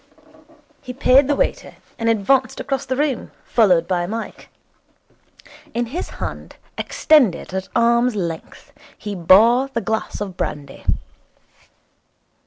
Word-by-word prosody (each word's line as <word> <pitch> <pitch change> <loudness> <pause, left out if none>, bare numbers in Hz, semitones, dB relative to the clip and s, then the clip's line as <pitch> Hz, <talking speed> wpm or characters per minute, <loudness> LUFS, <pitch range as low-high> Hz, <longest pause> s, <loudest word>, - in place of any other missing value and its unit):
He 250 - -7
paid 260 +1 +4
the 290 - +2
waiter, - - -2 0.2
and 230 0 +1
advanced 255 +5 +1
across 275 0 -3
the 260 - -1
room, 280 -2 -1
followed 180 -7 +3
by 175 -1 -1
Mike. 225 +3 -6 1.3
In 240 0 0
his 300 +11 -5
hand, - - -6 0.2
extended 250 - +2
at 190 0 -4
arm's 235 0 +3
length, 170 - -6 0.2
he 210 -1 -6
bore 220 +9 +5
the 265 -3 -3
glass 220 0 -3
of 200 -3 -5
brandy. 140 -5 -5
230 Hz, 120 wpm, -20 LUFS, 190-260 Hz, 1.3 s, bore